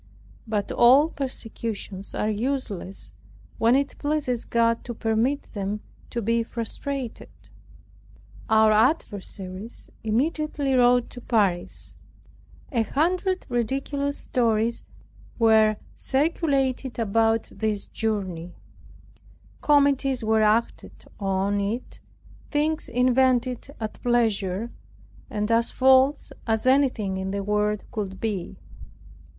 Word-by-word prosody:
But 210 Hz, -2 st, -2 dB
all 265 Hz, +6 st, +6 dB
precautions 225 Hz, -7 st, -5 dB
are 210 Hz, -, 0 dB
useless, 215 Hz, -4 st, -3 dB, 0.5 s
when 230 Hz, +2 st, +4 dB
it 275 Hz, 0 st, -1 dB
pleases 290 Hz, -5 st, -1 dB
God 230 Hz, 0 st, +1 dB
to 240 Hz, -, -5 dB
permit 225 Hz, +6 st, 0 dB
them 205 Hz, 0 st, -3 dB, 0.3 s
to 235 Hz, -, -3 dB
be 230 Hz, +2 st, +2 dB
frustrated. 235 Hz, +3 st, -5 dB, 1.2 s
Our 220 Hz, 0 st, +5 dB
adversaries 205 Hz, -, -1 dB
immediately 285 Hz, +4 st, 0 dB
wrote 245 Hz, -1 st, +4 dB
to 245 Hz, -, -10 dB
Paris. 200 Hz, -8 st, -1 dB, 0.7 s
A 240 Hz, -5 st, +1 dB
hundred 360 Hz, -, 0 dB
ridiculous 275 Hz, +4 st, -1 dB
stories 230 Hz, -1 st, 0 dB, 0.6 s
were 220 Hz, -2 st, +4 dB, 0.2 s
circulated 270 Hz, -3 st, 0 dB
about 225 Hz, 0 st, +1 dB
this 215 Hz, -2 st, -2 dB
journey; 185 Hz, -6 st, -3 dB, 1.1 s
comedies 280 Hz, -3 st, +3 dB
were 220 Hz, 0 st, +3 dB
acted 215 Hz, +2 st, 0 dB
on 195 Hz, 0 st, 0 dB
it, 220 Hz, +5 st, -4 dB, 0.5 s
things 310 Hz, +1 st, 0 dB
invented 250 Hz, 0 st, +2 dB
at 220 Hz, -1 st, -6 dB
pleasure, 225 Hz, -3 st, 0 dB, 0.6 s
and 210 Hz, +2 st, -2 dB
as 230 Hz, +1 st, +3 dB
false 265 Hz, +2 st, +4 dB, 0.2 s
as 220 Hz, 0 st, 0 dB
anything 255 Hz, -8 st, +2 dB
in 190 Hz, 0 st, -3 dB
the 200 Hz, +1 st, -2 dB
world 210 Hz, +1 st, 0 dB
could 195 Hz, -3 st, -4 dB
be. 205 Hz, -6 st, -3 dB
230 Hz, 100 wpm, -25 LUFS, 210-265 Hz, 1.2 s, all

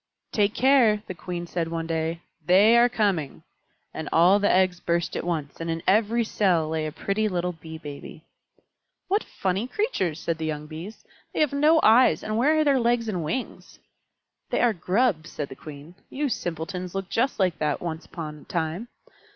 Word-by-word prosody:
"Take 205 Hz, -1 st, +1 dB
care," 240 Hz, -6 st, +4 dB
the -, -, -6 dB
Queen 175 Hz, 0 st, -6 dB
said 170 Hz, -1 st, -2 dB
one 165 Hz, 0 st, -3 dB
day. 165 Hz, +1 st, -2 dB, 0.2 s
"They 195 Hz, +8 st, +5 dB
are 240 Hz, +1 st, +6 dB
coming!" 200 Hz, -, -1 dB, 0.5 s
And 160 Hz, -, -5 dB
all 180 Hz, +5 st, +5 dB
the 205 Hz, -, +2 dB
eggs 185 Hz, -1 st, +2 dB
burst 170 Hz, -1 st, -1 dB
at -, -, -2 dB
once, 160 Hz, -4 st, -3 dB
and 165 Hz, -, -3 dB
in 165 Hz, 0 st, -3 dB
every 220 Hz, +4 st, +3 dB
cell 185 Hz, -7 st, +1 dB
lay 160 Hz, -1 st, -1 dB
a -, -, -5 dB
pretty 200 Hz, +7 st, -1 dB
little 180 Hz, -2 st, -1 dB
Bee 160 Hz, -1 st, -10 dB
Baby. 150 Hz, 0 st, -10 dB, 0.9 s
"What 405 Hz, +3 st, +2 dB
funny 195 Hz, +5 st, -2 dB
creatures!" 255 Hz, -, -1 dB
said 165 Hz, -1 st, -3 dB
the 160 Hz, -, -2 dB
young 150 Hz, -1 st, -4 dB
Bees. 165 Hz, +8 st, -9 dB, 0.3 s
"They -, -, -1 dB
have 300 Hz, -3 st, +2 dB
no 305 Hz, +3 st, +4 dB
eyes, 230 Hz, +4 st, +5 dB
and 215 Hz, -, -3 dB
where 290 Hz, +7 st, +3 dB
are 310 Hz, -, +4 dB
their 280 Hz, -3 st, +3 dB
legs 235 Hz, -1 st, +1 dB
and 185 Hz, -6 st, -2 dB
wings?" 245 Hz, +12 st, -5 dB, 0.7 s
"They -, -, 0 dB
are 240 Hz, -2 st, +3 dB
Grubs," 185 Hz, -1 st, 0 dB
said 145 Hz, -, -5 dB
the -, -, -9 dB
Queen. 150 Hz, +3 st, -11 dB, 0.2 s
"You 285 Hz, +1 st, -2 dB
simpletons 180 Hz, -1 st, -4 dB
looked 195 Hz, -1 st, -4 dB
just 255 Hz, +4 st, +1 dB
like 185 Hz, -4 st, +1 dB
that 150 Hz, -1 st, +1 dB
yourselves -, -, -11 dB
once 160 Hz, -1 st, -4 dB
upon 155 Hz, -3 st, -7 dB
a -, -, -16 dB
time. 170 Hz, +6 st, -3 dB
180 Hz, 190 wpm, -25 LUFS, 160-225 Hz, 0.9 s, are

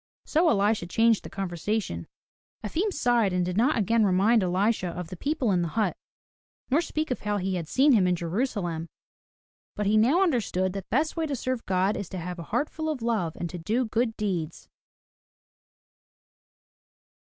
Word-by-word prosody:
So 325 Hz, +2 st, +3 dB
Elisha 205 Hz, -, +2 dB
changed 225 Hz, +3 st, +3 dB
the -, -, -8 dB
conversation. 185 Hz, -, -3 dB, 0.6 s
Efim 345 Hz, -, -1 dB
sighed 240 Hz, -, +2 dB
and 180 Hz, -1 st, +1 dB
did 180 Hz, 0 st, -3 dB
not 245 Hz, +7 st, +3 dB
again 225 Hz, +2 st, +2 dB
remind 205 Hz, +4 st, +4 dB
Elisha 185 Hz, +2 st, +1 dB
of 175 Hz, -1 st, -5 dB
the 185 Hz, -, -6 dB
people 265 Hz, -, 0 dB
in 180 Hz, -2 st, +2 dB
the 170 Hz, -, -1 dB
hut 210 Hz, -5 st, +1 dB, 0.8 s
nor 295 Hz, +5 st, +4 dB
speak 310 Hz, -3 st, -3 dB
of 250 Hz, -, -1 dB
how 210 Hz, -1 st, -1 dB
he 190 Hz, 0 st, -2 dB
had 170 Hz, -3 st, -3 dB
seen 275 Hz, -, +4 dB
him 200 Hz, -7 st, +4 dB
in 180 Hz, -, +2 dB
Jerusalem. 175 Hz, -2 st, -2 dB, 0.9 s
But 210 Hz, -, -2 dB
he 210 Hz, +2 st, +3 dB
now 270 Hz, -, +4 dB
understood 205 Hz, -, 0 dB
that 195 Hz, -2 st, -5 dB
the -, -, -63 dB
best 310 Hz, +3 st, +1 dB
way 325 Hz, -2 st, -1 dB
to 285 Hz, -, -2 dB
serve 255 Hz, -1 st, -3 dB
God 190 Hz, +2 st, +1 dB
is 200 Hz, -, -5 dB
to 190 Hz, -, -6 dB
have 180 Hz, +1 st, -5 dB
a -, -, -5 dB
heart 295 Hz, -, +1 dB
full 315 Hz, -1 st, -3 dB
of 280 Hz, -7 st, -3 dB
love 215 Hz, -9 st, 0 dB
and 175 Hz, -, -4 dB
to 180 Hz, -, -6 dB
do 225 Hz, +9 st, 0 dB
good 225 Hz, 0 st, -1 dB
deeds. 175 Hz, -7 st, -3 dB
210 Hz, 185 wpm, -27 LUFS, 180-245 Hz, 0.9 s, remind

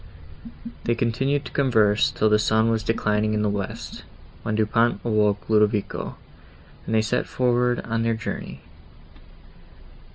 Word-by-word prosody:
They 120 Hz, -, +1 dB
continued 135 Hz, +5 st, 0 dB
to -, -, -8 dB
converse, 110 Hz, -6 st, +3 dB
till 110 Hz, -, 0 dB
the 105 Hz, 0 st, +4 dB
sun 110 Hz, +1 st, +2 dB
was 110 Hz, -1 st, 0 dB
declining 110 Hz, -1 st, 0 dB
in 105 Hz, -, 0 dB
the 105 Hz, -, +1 dB
west, 100 Hz, -2 st, -5 dB, 0.4 s
when 110 Hz, -1 st, -2 dB
Du 110 Hz, 0 st, +2 dB
Pont 115 Hz, 0 st, +1 dB
awoke 105 Hz, -2 st, +1 dB
Ludovico, 105 Hz, -1 st, 0 dB, 0.7 s
and 110 Hz, -, 0 dB
they 110 Hz, -, +3 dB
set 120 Hz, +3 st, -1 dB
forward 125 Hz, -1 st, +1 dB
on 115 Hz, 0 st, -2 dB
their 115 Hz, 0 st, +1 dB
journey. 110 Hz, -, -6 dB
110 Hz, 140 wpm, -23 LUFS, 105-115 Hz, 0.7 s, the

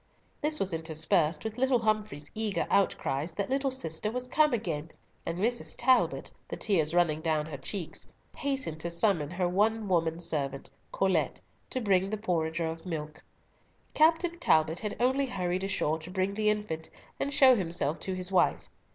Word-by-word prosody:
This 305 Hz, 0 st, +1 dB
was 190 Hz, -2 st, 0 dB
interspersed 160 Hz, 0 st, 0 dB
with 220 Hz, +1 st, -5 dB
little 260 Hz, -1 st, +4 dB
Humfrey's 215 Hz, -9 st, -1 dB
eager 215 Hz, -2 st, -1 dB
outcries 160 Hz, -5 st, +1 dB
that 200 Hz, +8 st, -3 dB
little 270 Hz, 0 st, +1 dB
sister 190 Hz, -6 st, -3 dB
was 250 Hz, +2 st, -3 dB
come 300 Hz, +4 st, +3 dB
again, 165 Hz, -9 st, -2 dB, 0.4 s
and 165 Hz, -, -2 dB
Mrs. 235 Hz, +5 st, -1 dB
Talbot, 260 Hz, -1 st, +2 dB, 0.2 s
the -, -, -4 dB
tears 170 Hz, -6 st, +1 dB
running 160 Hz, -3 st, +2 dB
down 155 Hz, -2 st, 0 dB
her 155 Hz, -2 st, -6 dB
cheeks, 170 Hz, +5 st, -5 dB, 0.3 s
hastened 270 Hz, -, -2 dB
to 170 Hz, -, -3 dB
summon 170 Hz, -3 st, +1 dB
her 180 Hz, +1 st, -1 dB
one 210 Hz, +4 st, +1 dB
woman 165 Hz, -3 st, +1 dB
servant, 140 Hz, -5 st, -3 dB, 0.2 s
Colet, 185 Hz, -6 st, +1 dB, 0.3 s
to 255 Hz, -, -2 dB
bring 195 Hz, -4 st, +2 dB
the 215 Hz, -, -2 dB
porringer 170 Hz, -5 st, -1 dB
of 165 Hz, 0 st, -5 dB
milk. 155 Hz, -3 st, -5 dB, 0.7 s
Captain 335 Hz, +2 st, +3 dB
Talbot 160 Hz, -, +3 dB
had 210 Hz, -, -4 dB
only 265 Hz, +3 st, +2 dB
hurried 185 Hz, -5 st, -2 dB
ashore 175 Hz, -5 st, 0 dB
to 160 Hz, +2 st, -9 dB
bring 190 Hz, +1 st, -1 dB
the 215 Hz, +1 st, +1 dB
infant, 210 Hz, -7 st, -2 dB, 0.3 s
and 280 Hz, -, -1 dB
show 265 Hz, -2 st, +7 dB
himself 165 Hz, -6 st, 0 dB
to 190 Hz, -, -3 dB
his 185 Hz, +1 st, -2 dB
wife. 185 Hz, -, +2 dB
185 Hz, 170 wpm, -29 LUFS, 160-220 Hz, 0.7 s, show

